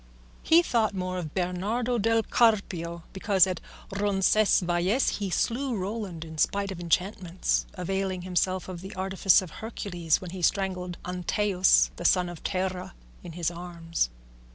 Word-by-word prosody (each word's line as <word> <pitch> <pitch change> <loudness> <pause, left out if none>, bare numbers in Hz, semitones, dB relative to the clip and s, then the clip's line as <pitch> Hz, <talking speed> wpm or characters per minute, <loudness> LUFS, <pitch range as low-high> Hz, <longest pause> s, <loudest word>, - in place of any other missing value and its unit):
He 335 +2 +5
thought 220 -8 +1
more 185 0 -2
of 155 -4 -7
Bernardo 205 +7 -1
del 225 +1 +2
Carpio 180 -9 +1
because 195 -1 +4
at 185 -3 -3 0.3
Roncesvalles 195 +1 +2
he 200 -2 -2
slew 245 +7 0
Roland 190 -4 -4
in 160 -1 -9
spite 200 +3 +1
of 185 - -6
enchantments, 180 +1 0
availing 190 0 -2
himself 185 0 0
of 180 -2 -7
the 190 +1 -9
artifice 190 0 +3
of 175 - -9
Hercules 175 -7 -2
when 180 -2 -8
he 185 0 -6
strangled 180 -1 0
Antaeus 180 +1 +2
the 175 - -7
son 180 0 +3
of 175 -2 -10
Terra 185 -1 -3 0.3
in 175 -2 -8
his 170 0 -1
arms. 170 - -3
185 Hz, 145 wpm, -27 LUFS, 175-200 Hz, 0.3 s, He